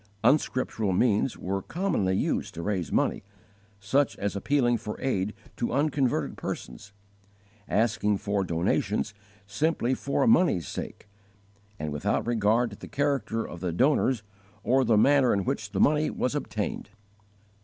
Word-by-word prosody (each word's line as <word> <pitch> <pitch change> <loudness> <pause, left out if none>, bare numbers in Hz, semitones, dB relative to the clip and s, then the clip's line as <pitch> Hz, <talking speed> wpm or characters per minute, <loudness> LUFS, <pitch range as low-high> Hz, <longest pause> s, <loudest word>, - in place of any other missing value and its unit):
Unscriptural 130 -8 +1
means 110 +4 +2
were 95 +1 -3
commonly 160 - 0
used - - -1
to 85 - -5
raise 90 -7 -2
money, - - +1 0.6
such 130 +9 +1
as 100 0 -2
appealing 120 +3 +2
for 110 -2 -5
aid 105 -7 -1 0.2
to 120 - -2
unconverted 135 - 0
persons, 65 +12 -6 0.8
asking 105 -1 +1
for 100 0 -1
donations 95 +5 0 0.3
simply 130 +4 0
for 140 - 0
money's 180 - +3
sake - - -7 0.7
and 75 -1 -4
without 75 - -1
regard 115 0 +2
to 100 - -10
the - - -10
character 135 -6 -1
of 85 - -9
the 90 0 -2
donors 130 - +2 0.4
or 130 +2 +3
the 115 -3 +3
manner 135 +2 +5
in 100 - 0
which 100 -1 -2
the - - -3
money 150 +1 +3
was 125 - -1
obtained. 110 -11 -3
110 Hz, 140 wpm, -27 LUFS, 100-135 Hz, 0.8 s, manner